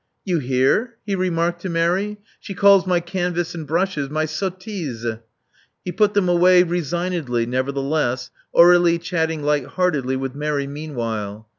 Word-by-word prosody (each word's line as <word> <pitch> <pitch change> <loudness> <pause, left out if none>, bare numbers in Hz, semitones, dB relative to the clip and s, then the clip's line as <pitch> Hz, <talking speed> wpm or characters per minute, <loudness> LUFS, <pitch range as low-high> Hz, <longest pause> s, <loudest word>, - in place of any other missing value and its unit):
' - - -52
* - - -53
"You 180 -4 0
hear?" 135 - +1
he 205 - -2
remarked 175 -2 -1
to 185 - -4
Mary. 180 +5 0 0.2
"She 195 - -8
calls 200 0 +5
my 180 -1 +2
canvas 175 -1 -2
and 160 -3 -7
brushes 160 -3 -1
my 155 +1 -1
sottises.'' 155 - -4 0.7
He 180 - -3
put 205 +3 +1
them 200 -3 +2
away 180 +1 +5
resignedly, 170 -7 -2
nevertheless, 130 +1 -1 0.2
Aurdlie 175 0 +6
chatting 160 -3 -2
light 145 -2 0
lieartedly 150 -8 0
with 135 -1 -4
Mary, 145 -1 -2
meanwhile. 115 -8 -5
165 Hz, 150 wpm, -21 LUFS, 140-180 Hz, 0.7 s, Aurdlie